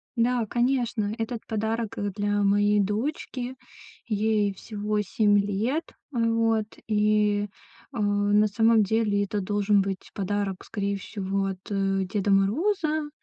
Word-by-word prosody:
Да, 240 0 +2
конечно. 240 -3 0
Этот 225 0 -3
подарок, 220 0 -2
э, 205 0 -1
для 205 0 0
моей 205 +1 +3
дочки. 245 +4 -2 0.5
Ей 210 -2 +1
всего 210 +1 -3
7 205 +1 +2
лет. 210 +10 0 0.3
Вот, 230 -3 +1 0.2
и, 210 -1 +2 0.5
э, - - -6
на 205 +1 +3
самом 225 +1 +4
деле 205 -1 +1
это 205 0 -2
должен 205 +1 +2
быть 195 -1 -4
подарок, 200 -1 -2
скорее 200 -1 -2
всего, 195 0 -3
от, 190 -1 -4
э, 195 -1 0
Деда 200 +1 -1
Мороза. 305 - +1
210 Hz, 125 wpm, -26 LUFS, 200-225 Hz, 0.5 s, самом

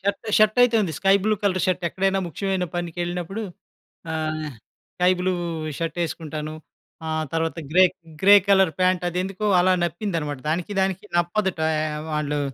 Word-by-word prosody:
Shirt 200 +3 -2
shirt 215 +2 +4
అయితే 245 -2 +4
ఉంది. 170 -5 -2
Sky 195 0 +4
blue 215 - +3
colour 185 -2 +1
shirt 185 -1 0
ఎక్కడైనా 195 +2 0
ముఖ్యమైన 190 +3 -2
పనికెళ్ళినప్పుడు 175 +4 -3 0.7
ఆహ్, 155 0 -2 0.5
స్కై 180 +1 +4
బ్లూ 185 +1 +1 0.5
షర్ట్ 165 0 -3
యేసుకుంటాను. 155 -2 -5 0.5
ఆహ్, 155 0 -1
తర్వాత 165 -1 -1
గ్రే 185 +2 +7 0.4
గ్రే 200 +1 +9
కలర్ 190 -4 +5
పాంట్ 185 -1 +2
అది 175 +1 -3
ఎందుకో 195 +2 -4
అలా 185 +1 +4
నప్పిందనమాట 165 -5 -3
దానికి 175 +5 -2
దానికి 190 0 -1
నప్పదటా 175 -2 0 0.3
ఆహ్, 150 - -5
వాళ్ళు 150 -1 -1
180 Hz, 150 wpm, -23 LUFS, 160-195 Hz, 0.7 s, గ్రే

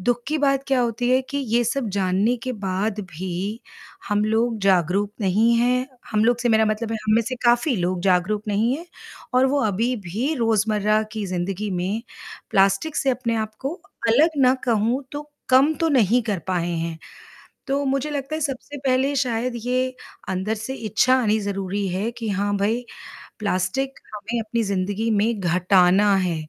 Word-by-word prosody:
दुःख 240 +5 0
की 310 - 0
बात 275 -1 +2
क्या 265 -2 +2
होती 245 +1 0
है 255 - +4
कि 280 - -1 0.2
ये 240 - +4
सब 245 0 -1
जानने 195 +6 +2
के 255 - -2
बाद 200 0 -2
भी, 185 +6 -4 0.5
हम 205 0 +1
लोग 225 +1 +1
जागरूक 195 +2 +2
नहीं 210 +4 +3
हैं 250 +2 +2 0.2
हम 215 0 +2
लोग 240 0 +3
से 240 0 0
मेरा 220 -1 +4
मतलब 215 +1 -2
है - - -1
हम 215 - +4
में 230 - +4
से 255 +3 -4
काफ़ी 240 +3 +3
लोग 180 0 -1
जागरूक 195 +3 +2
नहीं 225 +6 +1
हैं 335 +3 -10 0.5
और 255 +1 +5
वो 280 +1 +1
अभी 220 +5 0
भी 220 - -2
रोज़मर्रा 215 -2 +2
की 215 -2 -3
ज़िंदगी 185 +3 -3
में, 190 +5 -2 0.5
प्लास्टिक 195 +10 +2
से 270 - +2
अपने 240 -2 -1
आप 215 -1 -3
को, 275 +5 -3 0.3
अलग 285 +9 +5
ना 255 0 +5
कहूँ 235 +3 +1
तो 295 +1 -7 0.2
कम 270 +5 +5
तो 330 - +3
नहीं 245 -3 +3
कर 210 -5 -2
पाए 175 -1 0
हैं। 165 -1 -3 0.7
तो 280 +1 0
मुझे 275 +2 0
लगता 285 +1 -3
है 315 - -4
सबसे 285 0 -4
पहले 265 +2 +2
शायद 250 -2 0
ये 255 +1 0 0.3
अंदर 190 +4 -1
से 225 +5 -5
इच्छा 225 +3 +2
आनी 220 -2 +2
ज़रूरी 200 -1 -2
है 190 +5 -1
कि 230 -2 -5
हाँ 205 +1 0
भाई, 220 +5 0 0.5
प्लास्टिक 210 +7 -1 0.2
हमें 215 +3 -3
अपनी 225 +1 -1
ज़िंदगी 200 +3 -1
में 215 +1 +1
घटाना 185 +2 +4
है। 180 -3 0
220 Hz, 180 wpm, -23 LUFS, 195-255 Hz, 0.7 s, और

